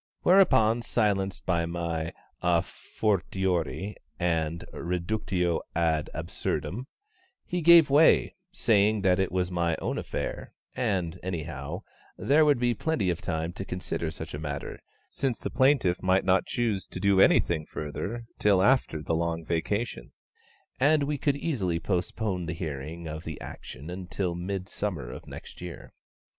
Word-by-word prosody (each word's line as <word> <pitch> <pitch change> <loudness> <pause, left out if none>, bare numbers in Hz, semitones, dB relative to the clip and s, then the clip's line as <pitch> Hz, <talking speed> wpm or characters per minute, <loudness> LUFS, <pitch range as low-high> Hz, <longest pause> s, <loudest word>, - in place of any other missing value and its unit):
Whereupon, 130 - +5
silenced 100 -5 0
by 85 -2 +1
my 85 -1 -3 0.3
a 85 -1 +3
fortiori 95 -3 -1 0.2
and 85 -2 0
reductio 90 0 -1
ad 80 -2 +1
absurdum, 90 +8 -3 0.6
he 180 0 -2
gave 165 -3 +7
way, 150 +3 +5 0.2
saying 110 - +3
that 95 -1 +3
it 95 - +1
was 90 0 0
my 85 -2 +1
own - - -2
affair, - - -5 0.2
and, 95 -8 -1
anyhow, 80 0 -5 0.3
there 150 +3 +4
would 145 -3 +4
be 120 0 +2
plenty 115 - 0
of 85 - -4
time 80 0 -2
to 95 - -5
consider 90 -3 -3
such 80 0 -7
a 75 - -4
matter, 75 -1 -5 0.3
since 135 -4 -2
the - - -4
plaintiff 130 -10 +3
might 95 0 +2
not 95 0 +3
choose 110 -6 0
to - - -6
do 100 0 +4
anything 80 -5 +4
further 100 +10 -5
till 100 -3 +4
after 100 - +2
the 80 - -1
Long 85 0 -1
Vacation, 85 - -2 0.7
and 145 +2 +4
we 145 0 -1
could 140 0 +1
easily 100 - -1
postpone 90 +1 -2
the 85 - -2
hearing 80 0 -5
of 80 +1 -6
the 80 -3 -6
action 70 +7 -8
until 90 0 -3
the 85 - -6
Midsummer 95 -6 -3
of - - -10
next - - -10
year. 90 -1 -8
90 Hz, 145 wpm, -28 LUFS, 85-110 Hz, 0.7 s, gave